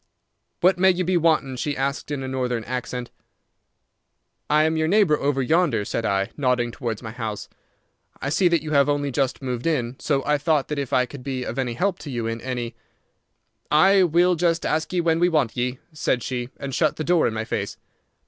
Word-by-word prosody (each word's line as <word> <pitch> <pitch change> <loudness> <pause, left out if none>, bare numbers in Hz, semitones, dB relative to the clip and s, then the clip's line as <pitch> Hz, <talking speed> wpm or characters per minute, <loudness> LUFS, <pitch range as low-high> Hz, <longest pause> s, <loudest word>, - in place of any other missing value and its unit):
"'What 180 0 +4
may 190 +1 +6
you 180 0 +1
be 180 +1 0
wantin'?' 155 -6 +2
she 145 +3 -2
asked, 140 +2 -2
in 145 -2 -3
a - - -4
Northern 125 -3 -2
accent. 125 0 -4 1.4
"'I 150 +1 +4
am 160 +1 +1
your 160 0 +1
neighbour 195 -4 +4
over 140 -1 0
yonder,' 140 - +2
said 115 - -2
I, 100 +2 0
nodding 125 -4 +1
towards 115 -2 -4
my 110 - -6
house. 110 -3 -5 0.7
'I - - -3
see 180 +5 +3
that 170 -3 +2
you 155 - -5
have 140 -1 +4
only 145 -1 0
just 135 0 -1
moved 125 +1 -3
in, 130 -6 -1
so 140 -3 0
I 150 0 +2
thought 150 -2 +1
that 150 -1 -2
if 140 -3 -4
I 125 -1 +3
could 140 +1 -10
be 130 -2 -3
of 125 +2 -4
any 125 -3 -1
help 190 +6 0
to 150 - -8
you 120 -4 -3
in 115 0 -3
any—' 120 -2 -4 1.0
"'Ay, 190 +6 +5
we'll 175 +1 +4
just 170 0 +1
ask 155 0 0
ye 180 -1 +1
when 165 -1 +2
we 175 +1 +4
want 150 -9 +1
ye,' 125 +1 -1 0.2
said 130 -5 0
she, 125 -1 -3
and 140 -1 -6
shut 155 +1 +2
the 155 - -3
door 175 0 +3
in - - -2
my 110 0 -2
face. - - -3
140 Hz, 215 wpm, -23 LUFS, 125-160 Hz, 1.4 s, may